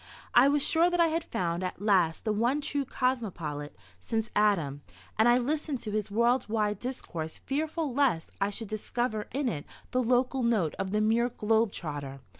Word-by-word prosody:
I 245 Hz, +3 st, +7 dB
was 285 Hz, 0 st, +2 dB
sure 335 Hz, +2 st, +4 dB
that 350 Hz, 0 st, -1 dB
I 335 Hz, -1 st, +5 dB
had 330 Hz, +1 st, -1 dB
found 170 Hz, 0 st, -2 dB
at 185 Hz, -, -4 dB
last 185 Hz, -5 st, +2 dB
the 215 Hz, -, +1 dB
one 240 Hz, +7 st, +1 dB
true 285 Hz, -1 st, -2 dB
cosmopolite 180 Hz, -, -2 dB, 0.2 s
since 225 Hz, -, -2 dB
Adam, 170 Hz, -10 st, +2 dB, 0.4 s
and 225 Hz, +2 st, +6 dB
I 240 Hz, -, +6 dB
listened 290 Hz, +2 st, -1 dB
to 215 Hz, -, -5 dB
his 210 Hz, -1 st, -2 dB
worldwide 220 Hz, -2 st, +1 dB
discourse 170 Hz, -11 st, -5 dB
fearful 305 Hz, 0 st, -2 dB
lest 250 Hz, -, +1 dB
I 195 Hz, -, +2 dB
should 220 Hz, +2 st, -6 dB
discover 215 Hz, 0 st, -2 dB
in 275 Hz, 0 st, -1 dB
it 150 Hz, -10 st, -2 dB, 0.3 s
the 255 Hz, -, +2 dB
local 255 Hz, +2 st, +2 dB
note 220 Hz, -10 st, +1 dB
of 195 Hz, -, -1 dB
the 210 Hz, +2 st, +1 dB
mere 230 Hz, +3 st, +2 dB
globe 220 Hz, -2 st, +1 dB
trotter. 145 Hz, -6 st, -5 dB
225 Hz, 180 wpm, -29 LUFS, 195-260 Hz, 0.4 s, I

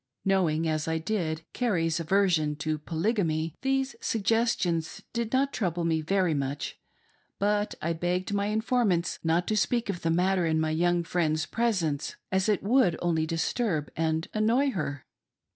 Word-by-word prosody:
Knowing, 170 Hz, -5 st, +2 dB
as 155 Hz, -1 st, -1 dB
I 160 Hz, 0 st, 0 dB
did, 165 Hz, -3 st, -2 dB
Carrie's 170 Hz, -9 st, 0 dB
aversion 165 Hz, -3 st, +2 dB
to 155 Hz, +1 st, -2 dB
Polygamy, 165 Hz, -1 st, -1 dB
these 270 Hz, 0 st, 0 dB
suggestions 200 Hz, -7 st, 0 dB
did 235 Hz, -2 st, -2 dB
not 275 Hz, +1 st, +1 dB
trouble 175 Hz, -4 st, -1 dB
me 160 Hz, -1 st, +1 dB
very 185 Hz, +1 st, +1 dB
much; 140 Hz, 0 st, -3 dB, 0.6 s
but 205 Hz, +1 st, 0 dB
I 170 Hz, +1 st, +1 dB
begged 180 Hz, +4 st, -1 dB
my 200 Hz, 0 st, +1 dB
informants 215 Hz, -5 st, +1 dB
not 165 Hz, +2 st, +2 dB
to 215 Hz, -, +1 dB
speak 220 Hz, +4 st, +1 dB
of 175 Hz, -, -7 dB
the 165 Hz, -, 0 dB
matter 180 Hz, +1 st, +2 dB
in 160 Hz, 0 st, +1 dB
my 160 Hz, 0 st, 0 dB
young 175 Hz, +2 st, +2 dB
friend's 160 Hz, -2 st, 0 dB
presence 185 Hz, -11 st, -1 dB, 0.2 s
as 190 Hz, +2 st, +1 dB
it 210 Hz, -, +1 dB
would 225 Hz, -5 st, +3 dB
only 160 Hz, -2 st, 0 dB
disturb 165 Hz, -, -1 dB
and 160 Hz, 0 st, 0 dB
annoy 235 Hz, +6 st, +2 dB
her. 145 Hz, -, -4 dB
175 Hz, 155 wpm, -28 LUFS, 160-210 Hz, 0.6 s, would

